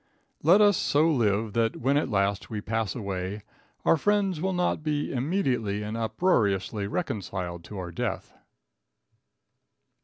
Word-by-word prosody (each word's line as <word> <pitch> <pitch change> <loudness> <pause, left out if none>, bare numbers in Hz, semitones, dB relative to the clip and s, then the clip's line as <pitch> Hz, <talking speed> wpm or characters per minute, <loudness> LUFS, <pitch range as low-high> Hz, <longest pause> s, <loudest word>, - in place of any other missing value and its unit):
Let 180 +7 +6
us 205 -2 +5
so 150 +3 +3
live 110 -7 +1
that 115 0 +1
when 135 +3 +1
at 145 - +1
last 100 -2 0
we 110 - -3
pass 110 0 -2
away 100 -2 -4 0.4
our - - +5
friends 195 -1 +1
will 190 +1 0
not 180 -3 0
be 150 -1 -1
immediately 125 - 0
and 105 +1 -4
uproariously 110 - +1
reconciled 95 - -4
to 105 - -8
our 90 -2 -5
death. 85 - -4
115 Hz, 140 wpm, -27 LUFS, 100-155 Hz, 0.4 s, Let